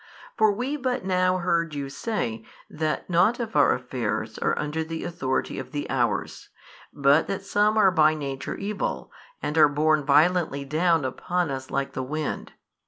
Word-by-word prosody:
For 220 Hz, -1 st, +4 dB
we 250 Hz, +8 st, -2 dB
but 255 Hz, -7 st, -2 dB
now 185 Hz, -1 st, +2 dB
heard 170 Hz, -3 st, 0 dB
you 140 Hz, -1 st, -3 dB
say, 135 Hz, -, -3 dB, 0.3 s
that 155 Hz, 0 st, -2 dB
nought 185 Hz, +8 st, +3 dB
of 225 Hz, -2 st, -4 dB
our -, -, +5 dB
affairs -, -, -3 dB
are 465 Hz, -1 st, 0 dB
under 150 Hz, +2 st, -2 dB
the 160 Hz, 0 st, -5 dB
authority 130 Hz, -7 st, -2 dB
of -, -, -8 dB
the 145 Hz, -1 st, -3 dB
hours, 125 Hz, -3 st, -1 dB, 0.4 s
but 140 Hz, +2 st, +3 dB
that 195 Hz, 0 st, -3 dB
some 210 Hz, +2 st, +2 dB
are 195 Hz, -3 st, +5 dB
by 155 Hz, -2 st, +4 dB
nature 135 Hz, -3 st, -4 dB
evil, 200 Hz, +1 st, -3 dB, 0.3 s
and 150 Hz, +2 st, 0 dB
are 150 Hz, -1 st, +7 dB
borne 155 Hz, +1 st, +2 dB
violently 150 Hz, 0 st, +2 dB
down 160 Hz, +1 st, +2 dB
upon 175 Hz, +5 st, -2 dB
us 130 Hz, -1 st, -5 dB
like 140 Hz, 0 st, -2 dB
the -, -, -3 dB
wind. 150 Hz, +3 st, -4 dB
160 Hz, 170 wpm, -25 LUFS, 145-190 Hz, 0.4 s, are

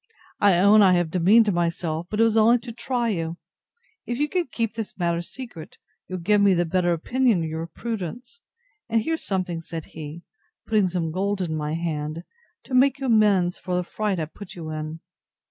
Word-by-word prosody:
I 200 Hz, -4 st, +5 dB
own 200 Hz, +4 st, +6 dB
I 190 Hz, -2 st, +6 dB
have 175 Hz, -2 st, +1 dB
demeaned 205 Hz, +4 st, +4 dB
myself; 170 Hz, -1 st, -1 dB
but 210 Hz, -, -3 dB
it -, -, +6 dB
was 225 Hz, -1 st, +3 dB
only 225 Hz, +2 st, +6 dB
to 240 Hz, -, -7 dB
try 240 Hz, 0 st, -1 dB
you. 165 Hz, -4 st, -2 dB, 0.7 s
If 240 Hz, -, -2 dB
you 295 Hz, +2 st, +1 dB
can 355 Hz, +1 st, -1 dB
keep 230 Hz, -3 st, -2 dB
this 220 Hz, -2 st, -6 dB
matter 170 Hz, -2 st, 0 dB
secret, 180 Hz, -5 st, -10 dB, 0.3 s
you'll 185 Hz, -, -4 dB
give 205 Hz, +4 st, +2 dB
me 200 Hz, -2 st, +5 dB
the 175 Hz, 0 st, +1 dB
better 175 Hz, +1 st, +1 dB
opinion 220 Hz, +3 st, +1 dB
of 160 Hz, -, -3 dB
your 160 Hz, +1 st, -4 dB
prudence; 230 Hz, -, -6 dB, 0.5 s
and 225 Hz, -1 st, +2 dB
here's 325 Hz, +5 st, -2 dB
something, 185 Hz, -4 st, -2 dB
said 165 Hz, -1 st, -7 dB
he, 160 Hz, +2 st, -8 dB, 0.4 s
putting 210 Hz, -4 st, +2 dB
some 170 Hz, -3 st, -2 dB
gold 195 Hz, +3 st, -1 dB
in 170 Hz, -4 st, -2 dB
my 150 Hz, 0 st, -2 dB
hand, 160 Hz, -1 st, -3 dB, 0.4 s
to 265 Hz, -, -10 dB
make 265 Hz, +2 st, +4 dB
you 270 Hz, -, -3 dB
amends 205 Hz, -7 st, +3 dB
for 180 Hz, -1 st, -3 dB
the 180 Hz, -, 0 dB
fright 205 Hz, 0 st, -2 dB
I 160 Hz, -, -1 dB
put 180 Hz, +5 st, -11 dB
you 160 Hz, -3 st, -6 dB
in. 155 Hz, +1 st, -5 dB
185 Hz, 195 wpm, -24 LUFS, 165-225 Hz, 0.7 s, own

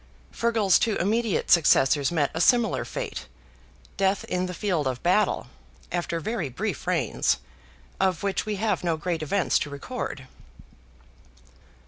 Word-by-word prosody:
FEARGAL'S 225 Hz, -6 st, +2 dB
two 225 Hz, -3 st, +1 dB
immediate 215 Hz, +3 st, 0 dB
successors 145 Hz, -3 st, +4 dB
met 150 Hz, -5 st, +1 dB
a 160 Hz, -, -2 dB
similar 235 Hz, +3 st, +3 dB
fate—death 60 Hz, -, -5 dB
in 180 Hz, 0 st, -2 dB
the 180 Hz, -, -5 dB
field 175 Hz, -9 st, 0 dB
of 130 Hz, -1 st, -3 dB
battle—after 175 Hz, -2 st, -1 dB
very 175 Hz, -, -3 dB
brief 195 Hz, -, -4 dB
reigns, 165 Hz, -10 st, +1 dB, 0.6 s
of 185 Hz, -3 st, +1 dB
which 200 Hz, -1 st, 0 dB
we 215 Hz, 0 st, -3 dB
have 210 Hz, 0 st, -1 dB
no 165 Hz, -2 st, 0 dB
great 165 Hz, 0 st, -2 dB
events 175 Hz, +4 st, +1 dB
to 145 Hz, -, -3 dB
record. 140 Hz, -, -6 dB
180 Hz, 125 wpm, -26 LUFS, 150-205 Hz, 0.6 s, successors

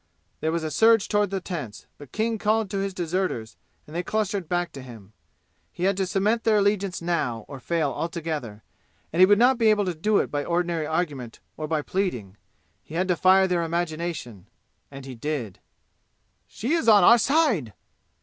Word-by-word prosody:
There 160 Hz, -, -1 dB
was 165 Hz, 0 st, -2 dB
a 155 Hz, -, -3 dB
surge 225 Hz, +5 st, +4 dB
toward 205 Hz, -1 st, +1 dB
the 195 Hz, 0 st, -2 dB
tents, 155 Hz, -, -7 dB
but 145 Hz, -3 st, -12 dB
King 220 Hz, 0 st, -1 dB
called 215 Hz, -1 st, +1 dB
to 200 Hz, -, -2 dB
his 195 Hz, 0 st, -2 dB
deserters 175 Hz, -10 st, -3 dB, 0.3 s
and 155 Hz, -, -12 dB
they 175 Hz, -, 0 dB
clustered 200 Hz, -3 st, -2 dB
back 175 Hz, -1 st, -1 dB
to 135 Hz, -, -9 dB
him. 110 Hz, -5 st, -13 dB, 0.6 s
He 175 Hz, -, -6 dB
had 195 Hz, +1 st, +2 dB
to 190 Hz, -1 st, 0 dB
cement 210 Hz, +5 st, 0 dB
their 220 Hz, -2 st, +3 dB
allegiance 200 Hz, -3 st, 0 dB
now 140 Hz, -10 st, -1 dB
or 140 Hz, -, -9 dB
fail 160 Hz, 0 st, -1 dB
altogether, 155 Hz, -11 st, -4 dB, 0.5 s
and 165 Hz, -, -1 dB
he 185 Hz, -, +8 dB
would 205 Hz, +1 st, +5 dB
not 250 Hz, +2 st, +4 dB
be 225 Hz, -2 st, +4 dB
able 210 Hz, -1 st, +3 dB
to 180 Hz, -, -1 dB
do 205 Hz, +6 st, +1 dB
it -, -, 0 dB
by 145 Hz, 0 st, -1 dB
ordinary 170 Hz, -2 st, -1 dB
argument 150 Hz, -8 st, -3 dB, 0.2 s
or 155 Hz, -, -5 dB
by 155 Hz, -1 st, -1 dB
pleading; 125 Hz, -, -3 dB, 0.4 s
he 155 Hz, -, -11 dB
had 185 Hz, +2 st, 0 dB
to 180 Hz, -, +3 dB
fire 190 Hz, +2 st, +5 dB
their 180 Hz, -2 st, 0 dB
imagination. 165 Hz, -, -4 dB, 0.4 s
And 135 Hz, -1 st, -10 dB
he 135 Hz, -, -7 dB
did. 125 Hz, -5 st, -4 dB, 0.9 s
"She 250 Hz, +8 st, -3 dB
is 330 Hz, -8 st, 0 dB
on 205 Hz, -3 st, +7 dB
our 235 Hz, +5 st, +7 dB
side!" 245 Hz, -, +1 dB
175 Hz, 190 wpm, -25 LUFS, 150-200 Hz, 0.9 s, he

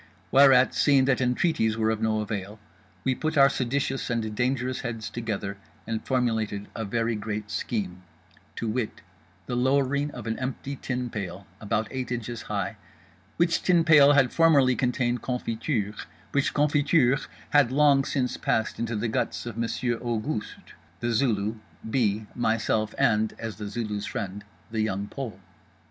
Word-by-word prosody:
Whereat, 135 Hz, -2 st, +6 dB
seeing 140 Hz, -3 st, +4 dB
that 130 Hz, -1 st, +2 dB
entreaties 125 Hz, -3 st, +1 dB
were 110 Hz, 0 st, +2 dB
of 110 Hz, 0 st, -2 dB
no 110 Hz, -1 st, +1 dB
avail, 105 Hz, -1 st, -4 dB, 0.5 s
we 130 Hz, -, +2 dB
put 155 Hz, +4 st, -2 dB
our 140 Hz, 0 st, +7 dB
seditious 135 Hz, +1 st, -1 dB
and 115 Hz, -2 st, -1 dB
dangerous 125 Hz, +2 st, -1 dB
heads 115 Hz, -3 st, -5 dB
together 105 Hz, -4 st, -4 dB, 0.3 s
and 115 Hz, -1 st, -3 dB
formulated 110 Hz, -6 st, -1 dB
a 115 Hz, -, -3 dB
very 115 Hz, +3 st, 0 dB
great 105 Hz, 0 st, -4 dB
scheme; 95 Hz, -6 st, -3 dB, 0.5 s
to 115 Hz, -, -3 dB
wit, 110 Hz, 0 st, -2 dB, 0.4 s
the 125 Hz, -, -3 dB
lowering 140 Hz, +3 st, +2 dB
of 120 Hz, -6 st, -8 dB
an 110 Hz, -, -2 dB
empty 135 Hz, +2 st, -4 dB
tin 125 Hz, -2 st, -3 dB
pail 100 Hz, -1 st, -5 dB
about 105 Hz, +1 st, -1 dB
eight 130 Hz, -2 st, -4 dB
inches 120 Hz, -1 st, -4 dB
high, 100 Hz, -2 st, -2 dB, 0.6 s
which 170 Hz, 0 st, +2 dB
tin 175 Hz, -2 st, +4 dB
pail 145 Hz, -3 st, +7 dB
had 135 Hz, -4 st, +3 dB
formerly 145 Hz, -6 st, +5 dB
contained 125 Hz, -1 st, 0 dB
confiture, 115 Hz, -3 st, -2 dB, 0.4 s
which 140 Hz, -1 st, +1 dB
confiture 145 Hz, -2 st, +3 dB, 0.3 s
had 145 Hz, -5 st, +5 dB
long 140 Hz, 0 st, +5 dB
since 130 Hz, -2 st, -1 dB
passed 110 Hz, -, 0 dB
into 115 Hz, 0 st, -2 dB
the 110 Hz, +3 st, -1 dB
guts 110 Hz, -, -2 dB
of 120 Hz, -3 st, -5 dB
Monsieur 115 Hz, +1 st, -1 dB
Auguste, 115 Hz, 0 st, -4 dB, 0.3 s
The 120 Hz, 0 st, -1 dB
Zulu, 110 Hz, -3 st, +1 dB, 0.3 s
B., 110 Hz, -3 st, +1 dB
myself, 110 Hz, -2 st, 0 dB
and—as 110 Hz, +1 st, 0 dB
The 105 Hz, -1 st, -5 dB
Zulu's 105 Hz, -1 st, -3 dB
friend—The 105 Hz, +1 st, -5 dB
Young 100 Hz, -2 st, -1 dB
Pole. 120 Hz, -9 st, -6 dB
120 Hz, 150 wpm, -26 LUFS, 110-135 Hz, 0.6 s, our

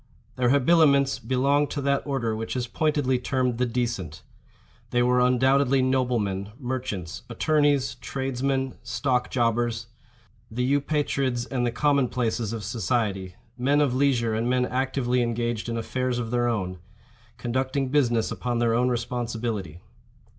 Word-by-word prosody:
Their 125 Hz, -1 st, +2 dB
habiliments 140 Hz, -1 st, +4 dB
belonged 140 Hz, +3 st, +1 dB
to 145 Hz, -, -3 dB
that 140 Hz, 0 st, +2 dB
order 120 Hz, -6 st, -1 dB
which 115 Hz, +3 st, -4 dB
is 125 Hz, -1 st, -1 dB
pointedly 135 Hz, 0 st, 0 dB
termed 125 Hz, -1 st, -1 dB
the 125 Hz, -, +2 dB
decent. 115 Hz, -9 st, -3 dB, 0.7 s
They 120 Hz, 0 st, +2 dB
were 125 Hz, 0 st, +3 dB
undoubtedly 130 Hz, +2 st, +3 dB
noblemen, 115 Hz, -7 st, 0 dB
merchants, 120 Hz, -, -4 dB
attorneys, 145 Hz, +1 st, +2 dB
tradesmen, 130 Hz, +1 st, -2 dB
stock 125 Hz, +1 st, -1 dB
jobbers—the 120 Hz, 0 st, -3 dB
Eupatrids 140 Hz, -2 st, 0 dB
and 125 Hz, -2 st, -1 dB
the -, -, 0 dB
common 140 Hz, 0 st, +2 dB
places 115 Hz, -3 st, -1 dB
of 115 Hz, -2 st, -4 dB
society—men 115 Hz, +5 st, -1 dB
of 145 Hz, -4 st, +2 dB
leisure 130 Hz, -4 st, +2 dB
and 115 Hz, +2 st, 0 dB
men 125 Hz, 0 st, +2 dB
actively 125 Hz, -1 st, 0 dB
engaged 120 Hz, -1 st, -2 dB
in 115 Hz, -, -2 dB
affairs 125 Hz, +2 st, -2 dB
of 115 Hz, -2 st, -3 dB
their 120 Hz, 0 st, +1 dB
own—conducting 115 Hz, +6 st, -4 dB
business 120 Hz, -5 st, +2 dB
upon 120 Hz, -1 st, -2 dB
their 115 Hz, -1 st, +2 dB
own 125 Hz, +2 st, +2 dB
responsibility. 115 Hz, -7 st, -3 dB
125 Hz, 130 wpm, -25 LUFS, 115-130 Hz, 0.7 s, habiliments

